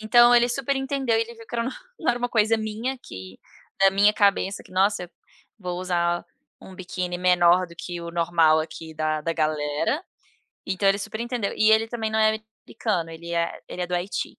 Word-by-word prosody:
então 240 +2 +6
ele 240 0 +5
super 275 +2 -1
entendeu 270 -4 0
e - - +2
ele 235 +1 -4
viu 230 -1 -14
que - - -9
era 235 - +1
não 480 - -7
era 245 0 +2
uma 245 0 -2
coisa 225 0 +3
minha 220 +4 -3
que, 95 - -11 0.4
da 195 0 +6
minha 200 +2 +5
cabeça 200 -1 +2
que - - -18
nossa, 190 -1 +1 0.5
vou 180 -2 -4
usar 175 -1 0 0.3
um 190 - -13
biquíni 180 -1 -4
menor 180 0 +4
do 170 0 -15
que 175 -1 -6
o 170 0 -6
normal 165 -2 +3
aqui 160 0 -6
da 155 0 -1
da 165 +2 -2
galera, 155 - 0 0.6
então 195 +1 +1
ele 195 +1 +3
super 220 - -6
entendeu 235 -4 -2
e 215 0 +5
ele 220 +1 +3
também 225 -2 -3
não 220 - +1
é 215 0 +3 0.3
americano, 185 -8 -2
ele 170 +1 -8
é 170 0 -1
ele 180 - -5
é - - -2
do 180 - -3
Haiti. 180 +3 -3
195 Hz, 205 wpm, -24 LUFS, 170-225 Hz, 0.6 s, então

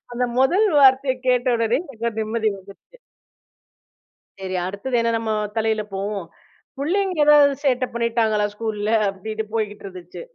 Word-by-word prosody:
அந்த 250 +1 -1
முதல் 360 +12 +3
வார்த்தைய 265 -1 +5
கேட்ட 250 0 +2
உடனே 230 +1 +1
எனக்குலா 235 -7 -4
நிம்மதி 220 0 -1
வந்துருச்சு. 200 - -17 1.4
சரி, 185 -1 -4
அடுத்தது 200 +7 -4
என்ன 230 0 +1
நம்ம 225 -1 -3 0.3
தலையில 220 -1 +1
போகும்? 200 -1 -3 0.5
புள்ளைங்க 365 +5 -1
ஏதாவது 290 -1 +6
சேட்டை 255 -2 +1
பண்ணிட்டாங்களா 225 -3 +1
ஸ்கூல்ல? 215 -1 -3 0.2
அப்படின்னு 215 +3 -5
போய்கிட்டு 210 -2 -3
இருந்துச்சு. 180 -2 -10
230 Hz, 130 wpm, -22 LUFS, 210-260 Hz, 1.4 s, ஏதாவது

